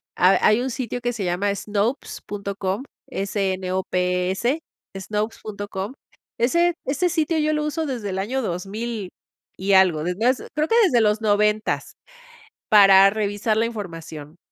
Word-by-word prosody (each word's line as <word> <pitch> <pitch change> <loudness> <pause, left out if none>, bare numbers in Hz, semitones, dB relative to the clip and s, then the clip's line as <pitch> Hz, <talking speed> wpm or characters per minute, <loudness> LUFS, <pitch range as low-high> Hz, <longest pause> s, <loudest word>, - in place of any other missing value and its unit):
Hay 185 +2 +5
hay 215 +3 +4
un 260 0 -2
sitio 245 -1 -4
que 245 0 -1
se 210 -4 -3
llama 190 +3 0
Snopes 210 +5 -2
punto 200 -1 -5
com, 195 +4 -2 0.3
S-N-O-P-E-S, 190 - -1 0.4
Snopes 210 +3 -3
punto 205 -1 -6
com. 200 +5 -5 0.5
Ese 340 +9 +3
ese 300 +7 0
sitio 320 -1 0
yo 310 0 +1
lo 300 0 0
uso 315 +1 -2
desde 235 -7 -4
el 190 - -3
año 255 +7 -1
2000 205 +2 -4 0.5
y 195 +1 0
algo, 180 -5 +4
desde 180 +6 -2
ha - - +7 0.2
creo 305 +1 +1
que 455 - +3
desde 245 -10 +3
los 210 0 +2
90, 210 0 +1 0.8
para 195 -2 +8
revisar 215 +1 -1
la 230 - +2
información. 165 -8 -8
210 Hz, 155 wpm, -23 LUFS, 190-240 Hz, 0.8 s, para